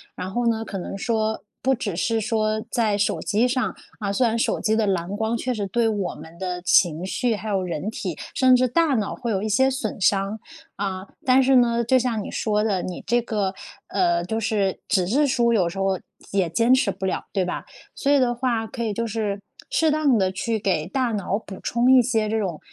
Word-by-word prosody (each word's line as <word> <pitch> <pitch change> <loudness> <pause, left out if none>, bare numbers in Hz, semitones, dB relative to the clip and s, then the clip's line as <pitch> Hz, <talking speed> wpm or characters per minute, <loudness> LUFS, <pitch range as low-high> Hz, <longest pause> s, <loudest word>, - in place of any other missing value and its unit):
然 185 +1 -5
后 240 +3 -1
呢， 225 -1 +1
可 205 - -6
能 185 - -5
说 220 +1 -1 0.2
不 265 - +3
只 210 -7 -3
是 225 +6 0
说 215 -1 0
在 220 -4 +1
手 205 +1 0
机 220 +4 +1
上 255 0 -1 0.2
啊， 200 -2 -2
虽 240 +4 +3
然 230 +1 0
手 - - 0
机 220 -1 +2
的 220 -1 +2
蓝 190 0 -1
光 220 +1 0
确 250 +2 -2
实 215 -5 -2
对 225 +3 +1
我 200 -5 -2
们 165 +1 -12
的 180 -1 -4
情 175 -2 +3
绪， 230 +5 0
还 215 +1 -6
有 195 -2 0
人 175 +2 -3
体， 185 -6 -5 0.2
甚 255 -1 +5
至 255 0 +3
大 315 +3 +2
脑 215 -5 -1
会 240 -4 -3
有 195 - 0
一 215 - -2
些 260 +6 +4
损 240 -6 -3
伤， 195 +2 +1 0.4
啊， 195 -1 -4 0.2
但 260 0 +5
是 265 0 +4
呢， 235 -1 +4
就 255 +3 +3
像 235 -4 0
你 - - -7
说 210 -1 0
的， 195 -5 0
你 180 - -6
这 240 +3 +3
个， 200 -4 -1 0.3
呃， 175 -3 +1
就 220 +6 -2
是 205 -3 0
纸 185 -6 +2
质 280 +9 +3
书， 240 -3 +2
有 190 -6 +3
时 185 +3 -5
候 195 -1 +1 0.3
也 195 -3 +1
坚 230 +8 +2
持 255 -6 +4
不 190 - -4
了 - - -2
对 190 -3 +1
吧？ 180 - -4 0.3
所 280 - 0
以 285 - +5
的 245 -2 +2
话 235 -3 -1
可 235 +1 -5
以 215 -2 -1
就 230 +2 -2
是 210 -2 -2 0.3
适 320 - +3
当 295 -5 +3
地 185 -1 +1
去 225 +4 -2
给 175 -5 0
大 255 +2 0
脑 200 -1 -1
补 195 -3 -10
充 240 +2 +2
一 260 - +8
些 225 -3 0
这 220 - 0
种， 180 -7 -3
215 Hz, 245 characters per minute, -23 LUFS, 195-240 Hz, 0.4 s, 一